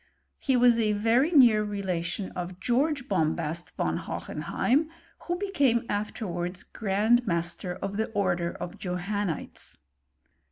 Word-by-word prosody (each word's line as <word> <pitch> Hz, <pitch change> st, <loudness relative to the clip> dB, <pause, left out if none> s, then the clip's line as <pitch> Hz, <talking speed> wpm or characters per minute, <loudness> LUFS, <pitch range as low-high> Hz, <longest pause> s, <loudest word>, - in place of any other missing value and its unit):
He 265 Hz, -2 st, +2 dB
was 240 Hz, -1 st, +5 dB
a 215 Hz, -2 st, +2 dB
very 230 Hz, +8 st, +3 dB
near 240 Hz, -9 st, +6 dB
relation 190 Hz, -2 st, -3 dB
of 180 Hz, 0 st, -6 dB
George 265 Hz, +5 st, +1 dB
Bombast 160 Hz, -, -1 dB
von -, -, 0 dB
Hohenheim, 295 Hz, +6 st, -1 dB, 0.4 s
who 350 Hz, 0 st, 0 dB
became 285 Hz, -, +1 dB
afterwards 185 Hz, -3 st, -3 dB
grand 220 Hz, +3 st, +1 dB
master 170 Hz, 0 st, -1 dB
of 200 Hz, +2 st, -4 dB
the 220 Hz, -, 0 dB
order 175 Hz, -4 st, +1 dB
of 175 Hz, -, -7 dB
Johannites. 180 Hz, -1 st, -3 dB
205 Hz, 120 wpm, -28 LUFS, 180-240 Hz, 0.4 s, near